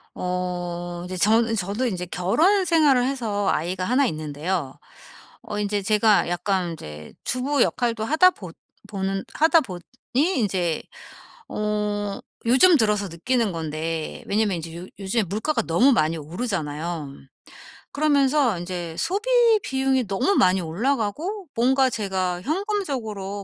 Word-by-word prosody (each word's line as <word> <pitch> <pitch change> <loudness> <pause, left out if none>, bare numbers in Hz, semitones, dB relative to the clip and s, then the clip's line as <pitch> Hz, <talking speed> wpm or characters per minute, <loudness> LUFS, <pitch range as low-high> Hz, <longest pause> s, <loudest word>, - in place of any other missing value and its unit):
어 175 -1 -3
인제 185 +1 -5
전 225 +4 +3
저도 205 +5 -1
인제 180 -5 -3
결혼생활을 310 - +3
해서 225 -7 -1
아이가 180 +3 -2
1 260 +7 +3
있는데요. 155 - -3 0.7
어 210 - -6
인제 205 0 -1
제가 210 -1 +3
약간 180 0 -1
인제 75 - -9
주부 270 +3 +1
역할도 230 -3 -1
하다 315 +8 +5
보 185 - -10 0.4
보는 195 -1 -2
하다 320 +1 +4
보니 180 -7 -7 0.3
인제 205 - +1 0.7
어 210 -1 -2 0.3
요즘 280 +8 +6
들어서 210 -3 +1
느끼는 225 +6 0
건데 160 0 -4
왜냐하면 205 -3 +1
인제 165 0 -7
요 180 - -7
요즘에 200 +3 0
물가가 220 - -1
너무 215 +12 +4
많이 160 -5 +1
오르잖아요. 160 - -4 0.8
그러면서 280 -5 +2
인제 175 -2 -5
소비 395 +8 -2 0.4
비용이 265 -2 0
너무 200 - +1
많이 185 - +4
올라가고 270 - -2
뭔가 260 +3 +3
제가 190 -5 -2
현금적으로 260 - -3
205 Hz, 275 characters per minute, -23 LUFS, 175-260 Hz, 0.8 s, 요즘